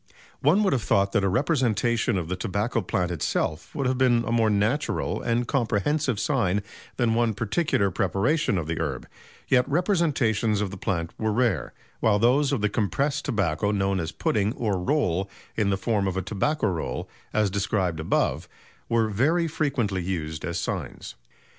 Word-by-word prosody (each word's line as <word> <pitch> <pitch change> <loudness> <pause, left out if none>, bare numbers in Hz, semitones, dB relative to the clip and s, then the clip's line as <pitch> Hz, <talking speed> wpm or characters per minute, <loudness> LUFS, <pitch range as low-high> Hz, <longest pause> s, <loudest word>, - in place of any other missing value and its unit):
One 170 +10 +4
would 195 - +2
have 130 - +1
thought 100 -1 +2
that 100 - +1
a 95 - +2
representation 120 - +1
of 85 -3 -3
the 95 - -2
tobacco 100 +5 -1
plant 90 -3 -1
itself 80 - -2
would 140 -3 -1
have 130 0 0
been 120 -3 +4
a - - -2
more 115 -2 +3
natural 105 +8 0
and 120 +1 0
comprehensive 130 +1 0
sign 105 -9 +1 0.3
than 120 -3 +2
one 115 -2 +1
particular 110 - 0
preparation 100 - +1
of 85 - -2
the 80 +1 -3
herb, 65 -5 -3 0.4
yet 125 -1 +3
representations 140 - +1
of 105 -2 -2
the 95 - -7
plant 85 -2 -2
were 110 0 0
rare, 115 -5 +1 0.3
while 105 -2 +3
those 130 +6 +3
of 135 -7 0
the 105 - +3
compressed 130 - -1
tobacco 100 - 0
known 95 -2 +1
as 80 -1 -3
pudding 100 +6 0
or 105 -5 -1
roll 95 - 0 0.3
in 105 -3 +1
the 95 - +1
form 100 0 0
of 95 0 -2
a 95 - -1
"Tobacco 110 - -1
Roll," 90 -6 -2 0.2
as 105 -2 +1
described 95 -4 -1
above, 80 - 0 0.4
were 115 -1 +2
very 150 - +1
frequently 130 - -1
used 80 -4 -4
as 85 0 -2
signs. 85 - -5
105 Hz, 170 wpm, -25 LUFS, 95-125 Hz, 0.4 s, One